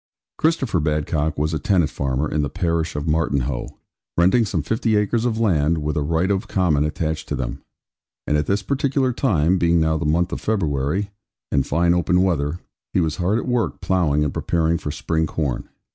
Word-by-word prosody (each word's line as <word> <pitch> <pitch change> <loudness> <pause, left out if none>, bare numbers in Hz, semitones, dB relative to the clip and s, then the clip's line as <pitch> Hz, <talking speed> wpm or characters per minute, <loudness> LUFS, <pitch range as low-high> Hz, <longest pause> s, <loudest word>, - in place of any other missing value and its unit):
Christopher 135 - +1
Badcock 75 0 -1
was 75 +2 0
a 80 - -1
tenant 90 -1 +2
farmer, 70 +2 -1
in 75 - -1
the 70 - -1
parish 85 -1 -1
of 75 +1 -3
Martinhoe, 70 -5 -1 0.4
renting 95 +7 +4
some 90 -7 -2
fifty 110 +5 0
acres 105 +3 +1
of 115 -2 0
land, 85 -7 +2
with 75 0 -2
a 75 - 0
right 80 +6 +1
of 100 +3 -1
common 85 -6 +2
attached 80 +1 -3
to - - -1
them; - - -4 0.6
and 75 - +1
at 75 - 0
this 100 +1 0
particular 135 -1 0
time, 95 - +2
being 85 0 +3
now 80 0 +1
the 85 - -3
month 85 +4 +1
of - - -4
February, 90 -1 -1 0.4
and 70 - +1
fine 85 +3 +2
open 90 +1 +2
weather, 80 -4 0 0.4
he - - +3
was 80 -2 0
hard 95 +4 +1
at 120 - -3
work 125 -3 0
ploughing 80 -6 +1
and 75 - -1
preparing 85 0 0
for - - -5
spring 80 +2 -1
corn. 75 -5 -3
85 Hz, 190 wpm, -22 LUFS, 75-95 Hz, 0.6 s, renting